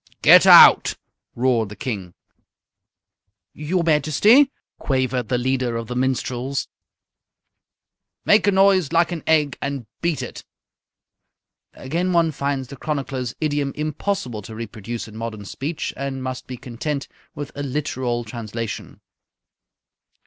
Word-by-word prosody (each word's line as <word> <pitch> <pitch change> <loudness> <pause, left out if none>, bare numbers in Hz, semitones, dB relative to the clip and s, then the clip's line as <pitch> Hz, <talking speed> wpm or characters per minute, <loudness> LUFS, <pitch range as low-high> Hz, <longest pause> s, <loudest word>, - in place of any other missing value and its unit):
"_ - - -53
"Get - - +8
out!" - - +8 0.4
roared 120 -3 +1
the 105 - -9
King. 95 -6 -5 1.4
"Your 170 +4 -1
Majesty?" 170 - +4 0.3
quavered 130 -3 -1
the 125 - +1
leader 125 -1 -1
of 115 - -4
the 125 - -5
minstrels. 130 +1 -2 1.6
"Make 205 -1 +4
a - - +5
noise 190 -5 +3
like 170 +1 +2
an 170 -3 -4
egg 150 -3 +2
and 140 -3 -4 0.2
beat 170 -3 -1
it!" - - -8 1.3
(Again 170 +7 -2
one 165 -2 +3
finds 140 -2 -3
the 140 - -9
chronicler's 135 -4 -3
idiom 145 -3 -1
impossible 150 - -3
to 110 +2 -10
reproduce 115 +1 -6
in 110 - -13
modern 110 -2 -6
speech, 145 +10 -4
and 135 -1 -4
must 130 -1 -5
be 125 - -7
content 135 +3 -4 0.3
with 145 -1 -6
a 145 - -6
literal 130 -4 -2
translation.) 115 0 -6
135 Hz, 125 wpm, -22 LUFS, 120-155 Hz, 1.6 s, Get